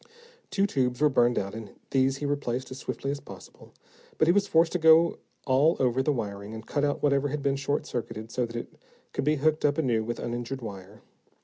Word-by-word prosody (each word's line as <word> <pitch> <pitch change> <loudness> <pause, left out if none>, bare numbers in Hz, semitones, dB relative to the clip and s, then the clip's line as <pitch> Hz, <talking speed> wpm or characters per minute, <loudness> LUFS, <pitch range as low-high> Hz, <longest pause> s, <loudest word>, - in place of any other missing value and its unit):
Two 195 -1 +1
tubes 125 -9 0
were 150 0 +4
burned 120 -3 +3
out, 100 0 -2
and 110 -3 -9 0.2
these 135 0 +2
he 145 - -4
replaced 130 -3 -2
as 130 - -7
swiftly 135 - -3
as 145 - -4
possible. - - -13 0.5
But 155 - +3
he - - +7
was 200 +2 +2
forced 165 -2 +3
to 180 - -1
go 160 +1 +5 0.3
all 140 +5 +4
over 130 0 +2
the 150 - +1
wiring, 105 -4 -4
and 110 0 -8
cut 145 - -1
out 145 -1 0
whatever 140 -1 +3
had 145 0 -4
been 140 -1 +2
short 140 +1 -1
circuited 115 -2 -5
so 125 0 -1
that 115 - -10
it 120 - -6 0.4
could - - -2
be 150 +1 +3
hooked 155 +2 +1
up 145 0 +2
anew 120 -8 +1
with 120 +1 -4
uninjured 120 +2 -4
wire. 100 -1 -9
135 Hz, 220 wpm, -27 LUFS, 120-145 Hz, 0.5 s, he